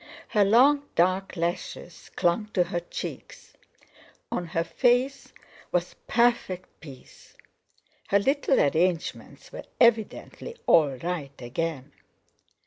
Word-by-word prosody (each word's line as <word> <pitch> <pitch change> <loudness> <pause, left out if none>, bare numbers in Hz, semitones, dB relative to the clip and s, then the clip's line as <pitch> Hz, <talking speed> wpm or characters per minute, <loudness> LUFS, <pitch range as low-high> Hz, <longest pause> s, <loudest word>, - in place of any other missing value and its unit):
Her 210 -3 +3
long 275 +8 +4
dark 185 +2 +1
lashes 175 0 -4
clung 175 +5 +1
to 180 - +4
her 175 0 -3
cheeks; 175 - -8 0.8
on 175 - -2
her 165 +1 -1
face 245 +9 +1 0.4
was - - -1
perfect 235 - 0
peace—her 145 +6 -8
little 270 +6 +2
arrangements 165 +3 -1
were - - -8
evidently 235 - +1
all 145 -5 +4
right 150 -2 -5
again. 140 +2 -4
180 Hz, 100 wpm, -26 LUFS, 165-235 Hz, 0.8 s, long